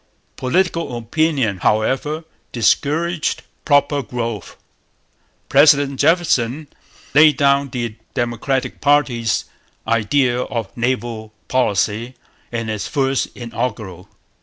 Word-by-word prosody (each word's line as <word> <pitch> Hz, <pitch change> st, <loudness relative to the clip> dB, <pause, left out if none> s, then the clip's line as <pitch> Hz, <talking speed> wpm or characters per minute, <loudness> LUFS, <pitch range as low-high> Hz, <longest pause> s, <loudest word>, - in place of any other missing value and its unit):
Political 165 Hz, -1 st, 0 dB
opinion, 130 Hz, -, 0 dB
however, 135 Hz, -, 0 dB, 0.3 s
discouraged 150 Hz, +8 st, 0 dB, 0.2 s
proper 145 Hz, 0 st, +3 dB
growth. 115 Hz, -, -5 dB, 0.9 s
President 140 Hz, -1 st, +4 dB
Jefferson 150 Hz, -4 st, +2 dB, 0.5 s
laid 150 Hz, 0 st, +6 dB
down 140 Hz, 0 st, +3 dB
the 120 Hz, -3 st, -3 dB, 0.2 s
Democratic 120 Hz, +2 st, -2 dB
party's 135 Hz, -6 st, +2 dB, 0.4 s
idea 120 Hz, +3 st, +2 dB
of 115 Hz, -5 st, -4 dB
naval 115 Hz, -3 st, -2 dB
policy 115 Hz, 0 st, 0 dB, 0.4 s
in 115 Hz, -1 st, -3 dB
his 110 Hz, -2 st, -3 dB
first 135 Hz, -2 st, 0 dB
Inaugural. 110 Hz, -6 st, -5 dB
125 Hz, 85 wpm, -19 LUFS, 115-145 Hz, 0.9 s, laid